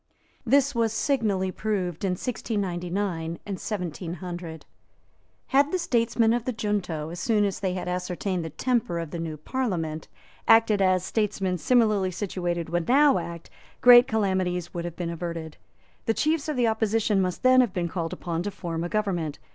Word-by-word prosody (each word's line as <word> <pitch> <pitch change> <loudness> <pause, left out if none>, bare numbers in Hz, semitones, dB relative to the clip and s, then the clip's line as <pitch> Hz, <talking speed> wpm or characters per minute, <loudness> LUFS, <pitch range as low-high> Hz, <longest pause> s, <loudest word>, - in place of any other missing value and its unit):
This 280 +3 +4
was 230 -2 +1
signally 215 -7 0
proved 185 -5 -2
in 190 -2 +1
1699 180 -5 -3
and 200 - -3
1700. 175 -3 -5 0.8
Had 280 +2 +3
the 370 - +1
statesmen 230 -7 +2
of 240 -1 -1
the 255 - 0
junto, 200 -9 -2
as 170 +1 -7
soon 210 +2 +2
as 195 - -2
they 185 -2 -1
had 180 - -4
ascertained 180 0 -2
the 160 - -5
temper 215 - -1
of 165 -2 -4
the 170 - -4
new 160 -2 -4
Parliament, 165 - -3 0.4
acted 225 -2 +5
as 185 -1 +3
statesmen 195 -4 -1
similarly 215 -1 +3
situated 175 -3 -3
would 170 0 -1
now 280 -2 +5
act, 170 -1 -8 0.3
great 245 0 +9
calamities 185 -5 -1
would 170 -1 -4
have 170 -1 -5
been 170 -2 -3
averted. 165 -2 -5 0.5
The 225 - +2
chiefs 310 0 0
of 305 - -1
the 245 - +3
opposition 220 -2 +1
must 185 +4 -2
then 255 0 +7
have 240 -5 +1
been 175 -2 -1
called 170 -1 -3
upon 170 -2 -3
to 205 - -2
form 170 -4 -4
a 175 - -3
government. 175 -8 -1
190 Hz, 170 wpm, -26 LUFS, 170-225 Hz, 0.8 s, great